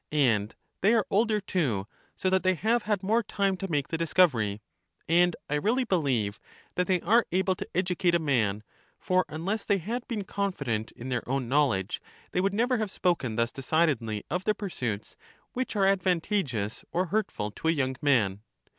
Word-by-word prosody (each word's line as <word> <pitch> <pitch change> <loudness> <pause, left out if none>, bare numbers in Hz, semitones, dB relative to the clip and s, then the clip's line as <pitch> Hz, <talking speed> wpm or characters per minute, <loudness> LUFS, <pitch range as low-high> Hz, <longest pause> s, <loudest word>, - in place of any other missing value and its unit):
And 115 -9 +2 0.3
they 215 +5 +5
are 220 - +2
older 215 +1 +3
too; 145 - -1 0.3
so 185 - 0
that 190 0 +3
they 185 0 +2
have 225 +7 +1
had 205 -2 +1
more 220 +5 +3
time 200 -3 0
to 195 +1 -5
make 145 -4 0
the 165 - -2
discovery. 130 - +2 0.5
And 175 +1 +4
I - - -3
really 220 - +2
believe 130 - 0 0.3
that 180 - 0
they 185 -3 +2
are 225 +6 +3
able 190 +1 +2
to - - -7
educate 180 -1 +2
a - - +6
man; 115 -10 0 0.3
for 185 0 +1
un 160 +2 -6
less 210 +2 -1
they 200 - +2
had 230 +7 -4
been 220 -4 -3
confident 140 - -2
in 125 +3 -8
their 125 -2 0
own 135 -2 -1
knowledge, 130 -9 +1 0.3
they 180 - +1
would 195 +1 +1
never 245 +2 +2
have 215 -2 -1
spoken 170 - 0
thus 115 +1 +1
decidedly 135 -7 0
of 180 +1 -2
the 215 - +2
pursuits 120 - -4 0.4
which 255 -2 -3
are 195 -2 +3
advantageous 180 - 0
or 180 +2 +1
hurtful 160 - -1
to 160 - -5
a - - +5
young 130 -4 0
man. 110 -9 +2
170 Hz, 185 wpm, -28 LUFS, 125-195 Hz, 0.5 s, a